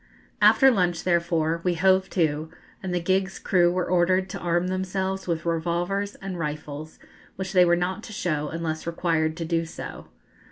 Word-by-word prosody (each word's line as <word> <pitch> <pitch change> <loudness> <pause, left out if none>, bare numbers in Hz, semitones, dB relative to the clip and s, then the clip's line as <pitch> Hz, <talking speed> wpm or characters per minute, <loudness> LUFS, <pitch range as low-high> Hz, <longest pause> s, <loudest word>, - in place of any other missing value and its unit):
After 270 -1 +7
lunch, 180 -6 0
therefore, 170 -2 +1
we 180 -1 +1
hove 190 +2 +3
to, 155 -3 0 0.3
and 190 - -4
the 180 - 0
gig's 190 +2 0
crew 175 -2 +3
were 180 0 -1
ordered 185 +2 +2
to - - -5
arm 175 0 0
themselves 190 +1 -2
with 165 -2 -2
revolvers 175 +5 -1
and 190 -2 -6
rifles, 150 0 -5 0.4
which 190 0 -5
they 180 -1 +6
were 175 0 +4
not 180 +3 -2
to - - -10
show 155 -7 -2
unless 160 0 -4
required 165 -2 0
to 165 - -3
do 165 0 0
so. 160 - -8
175 Hz, 170 wpm, -25 LUFS, 165-185 Hz, 0.4 s, After